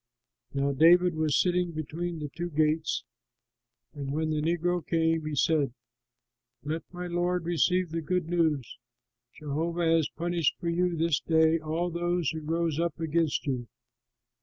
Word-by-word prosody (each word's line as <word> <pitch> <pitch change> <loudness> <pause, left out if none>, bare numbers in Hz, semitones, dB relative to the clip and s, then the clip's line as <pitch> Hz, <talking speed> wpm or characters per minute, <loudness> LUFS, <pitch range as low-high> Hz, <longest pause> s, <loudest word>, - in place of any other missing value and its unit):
Now 140 0 0
David 175 +5 +5
was 155 -2 +1
sitting 180 -1 +1
between 165 +3 -4
the 150 -2 -5
two 175 0 -3
gates, 155 0 +1 0.9
and 140 -2 -5
when 155 +2 -1
the 155 -1 0
negro 175 +2 0
came, 165 -1 +1
he 150 - -3
said, 140 -2 +2 0.9
"Let 155 +3 -2
my 180 0 -6
lord 175 0 -1
receive 175 +1 +1
the 165 0 -2
good 180 +1 -1
news; 160 -7 0 0.6
Jehovah 165 +4 -2
has 165 -2 +3
punished 170 -1 0
for 170 - -3
you 175 0 0
this 160 -1 +2
day 160 0 +3
all 160 +3 -2
those 175 -2 0
who 160 - -5
rose 165 0 -1
up 170 0 -1
against 160 -1 0
you.'" 125 -4 -2
165 Hz, 150 wpm, -28 LUFS, 155-175 Hz, 0.9 s, David